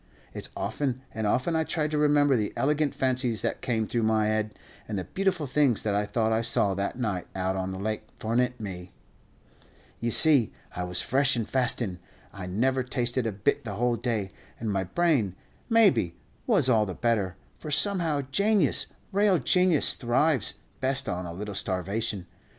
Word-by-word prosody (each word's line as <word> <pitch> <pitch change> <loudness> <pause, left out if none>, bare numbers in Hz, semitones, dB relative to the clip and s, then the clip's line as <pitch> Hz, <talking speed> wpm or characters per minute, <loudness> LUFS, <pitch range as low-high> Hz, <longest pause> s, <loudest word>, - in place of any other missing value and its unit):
It's - - -6
often 130 -3 -2
and 110 -1 -2
often 130 +10 +1
I 160 - +2
tried 155 -1 -1
to 155 - 0
remember 145 -2 +4
the 105 -3 -1
elegant 150 +1 +1
fancies 125 -3 0
that - - -2
came 110 -3 0
through 115 +2 -1
my 110 -1 +2
head, 110 0 -1 0.3
and 105 - -3
the 95 - -2
beautiful 190 - -1
things 135 -3 +2
that 105 - 0
I 105 +1 0
thought 110 +1 0
I 110 0 +2
saw 105 -3 +2
that 100 +4 -3
night 105 -8 -2
out 95 0 -1
on 95 0 -2
the 95 - -5
lake 110 +2 -3
fornint 125 +3 0
me! 90 -4 -7 1.1
Ye 120 - -1
see 140 -2 +5 0.2
I 90 - -2
was 90 -1 +1
fresh 135 +1 +3
and 115 -2 -2
fastin'; 120 -7 +1 0.3
I 95 -2 -7
never 130 +8 +1
tasted 125 -1 -1
a - - -1
bit 100 0 0
the 105 -4 -5
whole 120 +2 +1
day, 110 -4 -2 0.3
and 110 -2 -2
my 95 -1 -1
brain, 120 - +1 0.3
maybe, 185 - +4 0.3
was 195 - +3
all 110 -4 +3
the 95 - -5
better; 105 -6 0 0.2
for 155 - -7
somehow 160 -2 +2
janius, 200 -2 +2 0.2
real 200 -1 +3
janius, 180 -3 +3
thrives 130 - +1 0.2
best 135 +1 0
on 90 0 -3
a - - -6
little 105 +3 -6
starvation. 100 +1 -2
120 Hz, 180 wpm, -27 LUFS, 105-145 Hz, 1.1 s, see